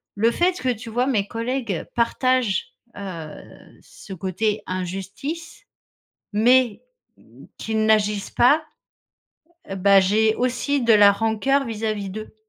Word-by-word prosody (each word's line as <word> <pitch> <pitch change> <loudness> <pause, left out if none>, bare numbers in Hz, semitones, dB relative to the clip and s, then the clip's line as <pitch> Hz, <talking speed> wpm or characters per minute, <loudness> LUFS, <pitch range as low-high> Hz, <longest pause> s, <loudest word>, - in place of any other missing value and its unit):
le 225 +3 +2
fait 355 +6 +1
que, 255 - -1
tu 235 -1 -4
vois, 245 +3 0
mes 210 -7 0
collègues 230 -5 -3
partagent, 255 - 0 0.2
heu, 170 -6 -10
ce 195 - -12
côté 195 +4 -2
injustice 195 - -6 0.7
mais 240 +1 +3 0.7
qu'ils 220 -1 -1
n'agissent 210 -2 +1
pas, 290 +6 +4 1.1
heu, 195 - -4
bah, 195 +1 +5
j'ai 215 +3 +2
aussi 255 +3 -1
de 235 -1 +4
la 205 -1 +7
rancœur 225 +6 0
vis-à-vis 215 -3 -3
d'eux. 215 +3 -8
220 Hz, 120 wpm, -22 LUFS, 200-250 Hz, 1.1 s, la